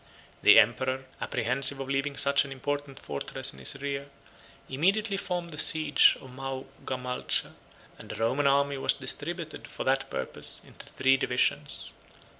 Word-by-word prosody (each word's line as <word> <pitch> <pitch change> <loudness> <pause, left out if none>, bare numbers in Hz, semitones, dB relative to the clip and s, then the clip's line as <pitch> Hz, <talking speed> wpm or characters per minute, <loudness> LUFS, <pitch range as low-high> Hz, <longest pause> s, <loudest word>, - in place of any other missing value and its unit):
The - - +8
emperor, 130 +4 +3 0.2
apprehensive 130 +4 +1
of 135 - -5
leaving 135 +1 -1
such 140 0 +4
an 140 - -9
important 140 +1 -4
fortress 70 - +2
in 65 - -13
his 65 - -3
rear, 140 0 -4 0.6
immediately 195 +9 +1
formed 175 -3 -3
the 150 - -6
siege 155 -1 +4
of 130 - -13
Maogamalcha; 130 -1 -4 0.5
and - - -12
the - - -5
Roman 130 +6 +1
army 140 0 +2
was - - +2
distributed, 155 +4 -3
for - - -6
that 135 0 0
purpose, - - -5
into - - -11
three 135 0 +2
divisions. 125 -1 -1
135 Hz, 145 wpm, -28 LUFS, 130-145 Hz, 0.6 s, The